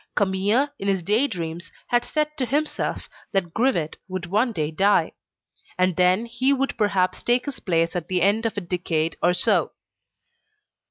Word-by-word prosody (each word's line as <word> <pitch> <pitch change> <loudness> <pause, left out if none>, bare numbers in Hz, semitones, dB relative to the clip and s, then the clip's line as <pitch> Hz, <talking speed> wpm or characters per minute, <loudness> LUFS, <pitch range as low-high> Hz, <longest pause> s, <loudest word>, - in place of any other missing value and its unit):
Camille, 200 +8 +2
in 195 - -4
his 190 -3 +1
day 215 +10 +2
dreams, 170 - -6 0.2
had 240 0 +2
said 300 +3 -2
to 275 - -2
himself 300 +4 -2 0.3
that 180 -4 0
Grivet 220 - 0
would 185 -1 -4
one 215 +8 +1
day 155 -7 -2
die, 195 +5 +2 0.7
and 185 -1 +2
that 180 +1 +4
he 245 +3 0
would 275 0 0
perhaps 195 -4 +1
take 245 +1 +1
his 285 -3 -6
place 165 -2 0
at 175 -3 -3
the 180 -2 0
end 215 +4 +2
of 220 - -6
a - - -1
decade 170 -3 -1
or 180 +1 +3
so. - - +2
195 Hz, 170 wpm, -24 LUFS, 175-240 Hz, 0.7 s, that